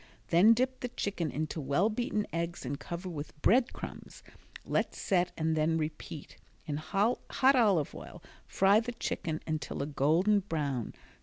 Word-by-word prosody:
Then 195 +7 +6
dip 255 +2 0
the 250 - -3
chicken 200 -8 -3
into 155 +2 -3
well 140 +9 +2
beaten 215 -2 -1
eggs 170 -2 -3
and 140 +3 -3
cover 170 +4 -6
with 150 -3 -7
bread 245 +3 +4
crumbs. - - -9 0.4
Let - - 0
set 180 -2 +1
and 160 0 +1
then 160 +1 +2
repeat. 155 -1 -6 0.3
In 150 -3 -3
hot 195 +10 0 0.2
olive 220 - +4
oil - - -10 0.2
fry 195 +2 +4
the 240 +2 -4
chicken 160 -8 -3
until 155 -3 -3
a - - -2
golden 160 +9 +3
brown. 145 - -3
170 Hz, 155 wpm, -31 LUFS, 155-210 Hz, 0.4 s, Then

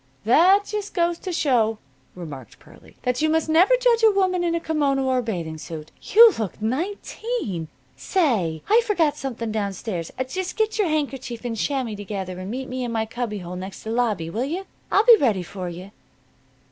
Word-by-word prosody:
"That 370 - +5
just 420 -1 -5
goes 340 -1 +1
to 370 - -5
show," 235 -9 +2 0.4
remarked 145 - -9
Pearlie, - - -18
"that 250 +2 0
you 315 - +2
must 320 0 +1
never 350 +10 +5
judge - - +3
a 445 - +7
woman 375 -3 +1
in 340 -1 +1
a - - 0
kimono 285 -4 0
or 260 -1 +2
a - - 0
bathing 170 -9 -4
suit. 155 -1 -8
You 455 0 +7
look 215 -5 -4
nineteen. 265 - -3 0.3
Say, 210 - 0
I 450 +3 +5
forgot 340 -10 +1
something 235 -4 -4
down 205 -2 -2
stairs. 180 -4 -5 0.2
Just 370 +6 -4
get 440 0 0
your 405 - +3
handkerchief 270 -6 -3
and 235 -2 -2
chamois 255 0 -1
together 195 -3 -5
and 185 +1 -6
meet 260 +4 -4
in 250 -2 -3
my 225 -1 0
cubbyhole 210 -6 -5
next 190 +1 -8
to 220 - -6
the 225 - -1
lobby, 210 -9 0
will 225 +7 -1
you? 350 +7 -4 0.3
I'll 410 - +4
be 470 -2 +9
ready 215 - +1
for 185 0 -6
you." 180 +3 -9
250 Hz, 190 wpm, -23 LUFS, -, 0.4 s, be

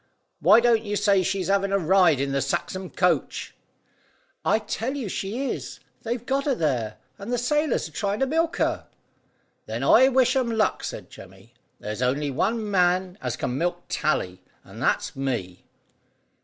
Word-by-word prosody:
"Why 200 +8 +6
don't 235 -2 +3
you 205 -2 -3
say 200 -2 +3
she's 190 0 -1
having 200 0 +1
a 195 - +3
ride 180 -4 +4
in 140 0 -1
the 140 0 0
Saxham 185 +7 -3
coach." 175 -6 0 0.9
"I - - +3
tell 225 +4 -3
you 265 -6 -4
she 205 +8 -3
is. - - -6 0.2
They've 240 +1 -4
got 275 +2 0
her 280 -3 +1
there, 125 - -1 0.2
and 200 +4 -6
the 245 - +1
sailors 295 +6 0
are - - -15
trying 205 0 -2
to - - +4
milk 325 +4 0
her." - - -1 0.8
"Then - - -4
I 260 - +6
wish 255 -1 +3
'em 235 -4 0
luck," 215 - +1
said - - -6
Jemmy. 95 +5 -14 0.3
"There's 105 +3 -5
only 140 +3 0
one 210 - -1
man 180 0 +1
as 125 -2 -2
can 125 +2 -3
milk 175 0 -1
Tally, 95 -12 -1 0.2
and - - -12
that's - - 0
me." 120 -10 -4
195 Hz, 170 wpm, -25 LUFS, 145-235 Hz, 0.9 s, Why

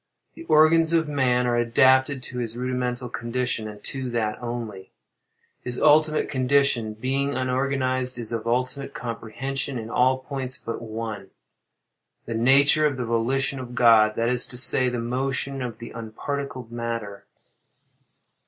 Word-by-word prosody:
The 330 - -11
organs 160 - +5
of 165 -2 +2
man 130 -4 +1
are 120 -1 +1
adapted 130 +3 +3
to 125 -1 -6
his 115 -1 -4
rudimental 125 0 -2
condition, 120 -1 -2
and 105 -1 -10
to 130 -2 -4
that 115 -2 -2
only; 115 -5 -6 0.7
his 125 0 -4
ultimate 155 0 +4
condition, 130 -4 +1
being 135 +5 -1
unorganized, 130 0 -1
is 115 -2 -3
of 115 -1 -3
unlimited 130 +3 -2
comprehension 125 +4 -4
in 115 0 -6
all 130 +2 +3
points 130 0 -6
but 115 -5 -6
one—the 110 0 -10
nature 140 +6 +4
of 140 -3 -3
the 125 - -3
volition 130 +4 0
of 125 -1 -8
God—that 115 -1 +4
is 125 0 0
to 125 - -7
say, 130 0 +5
the 125 - -3
motion 130 +3 -2
of 120 -3 -5
the 115 0 -9
unparticled 125 +2 -5
matter. 115 -4 -5
125 Hz, 140 wpm, -24 LUFS, 115-135 Hz, 0.7 s, organs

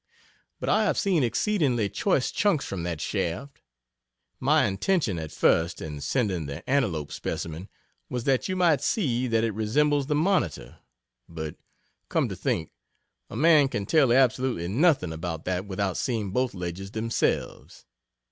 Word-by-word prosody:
But - - -4
I 215 - +3
have - - +1
seen 185 -6 +2
exceedingly 125 - +1
choice 130 - 0
chunks 200 -9 +1
from 95 -3 -4
that 85 -2 -3
shaft. 110 - -3 0.8
My - - +3
intention 105 - 0
at 80 -1 -6
first 85 +1 +2
in 75 -2 -6
sending 95 - -1
the 70 +3 -8
Antelope 95 - 0
specimen 85 +4 -5 0.4
was 125 -2 -3
that 135 +6 +1
you 185 - -1
might 170 -5 +3
see 130 - 0
that 115 -1 +1
it 115 -2 0
resembles 140 +7 +1
the 150 - +1
Monitor 125 - 0 0.5
but, 80 -2 -6 0.5
come - - +1
to - - -5
think, - - -2 0.6
a - - -8
man 155 -2 +5
can 105 -6 -3
tell 140 0 +4
absolutely 125 -7 +2
nothing 120 - +2
about 80 -1 -5
that 95 +2 -2
without 95 -1 -2
seeing 110 -6 -2
both 125 +1 0
ledges 90 +2 -5
themselves. 110 +2 -2
115 Hz, 150 wpm, -26 LUFS, 90-140 Hz, 0.8 s, man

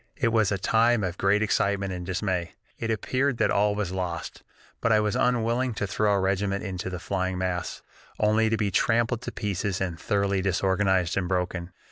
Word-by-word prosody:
"It 125 -5 +1
was 110 -3 +2
a 100 - +1
time 115 +3 +3
of 90 -1 -3
great 105 +2 +3
excitement 100 -2 0
and 90 -1 -5
dismay 90 -1 -2 0.2
it 115 - -3
appeared 130 +4 0
that - - +2
all 105 0 +2
was 105 -4 -2
lost; 90 -3 -4 0.4
but 115 - +2
I 110 - +5
was 105 -1 0
unwilling 120 0 +1
to 100 - -1
throw 105 +1 0
our 100 -1 +2
regiment 100 +1 0
into 95 -2 -4
the 90 - -4
flying 95 0 -2
mass, 90 -1 -3 0.4
only 110 +1 +3
to 115 - +1
be 105 -2 0
trampled 115 +3 +2
to - - -5
pieces 100 -2 -2
and 90 -3 -3
thoroughly 100 -1 0
disorganized 95 -1 +1
and 95 -2 0
broken. 90 -1 -2
100 Hz, 190 wpm, -26 LUFS, 95-110 Hz, 0.4 s, I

